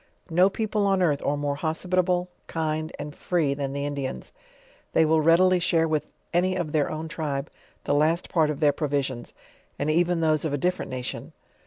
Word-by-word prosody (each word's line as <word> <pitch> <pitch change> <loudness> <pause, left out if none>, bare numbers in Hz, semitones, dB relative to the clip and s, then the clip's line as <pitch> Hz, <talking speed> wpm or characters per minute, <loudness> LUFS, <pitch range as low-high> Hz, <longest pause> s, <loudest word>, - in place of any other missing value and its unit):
No 180 +4 +5
people 210 0 -1
on 195 -1 +2
earth 150 -5 +2
are 145 - 0
more 145 -1 -2
hospitable, 180 +3 0 0.2
kind, 155 -1 -2
and 145 0 -6
free, 160 -5 0
than 140 -1 -3
the 140 +1 -3
Indians. 140 - -4 0.6
They 160 - +5
will 160 0 +3
readily 180 +3 +5
share 165 -2 +2
with 155 -1 -1 0.2
any 185 +2 +2
of 175 -5 -2
their 150 -2 +1
own 155 +1 -4
tribe 145 -3 -3 0.3
the - - 0
last 155 +4 +2
part 160 -3 +2
of 150 0 -4
their 145 -2 +4
provisions, 140 -5 -2 0.4
and 145 +2 0
even 175 +1 +2
those 155 -2 +2
of 155 -3 -1
a - - -1
different 180 +6 -1
nation. 125 -1 -5
155 Hz, 185 wpm, -26 LUFS, 145-175 Hz, 0.6 s, No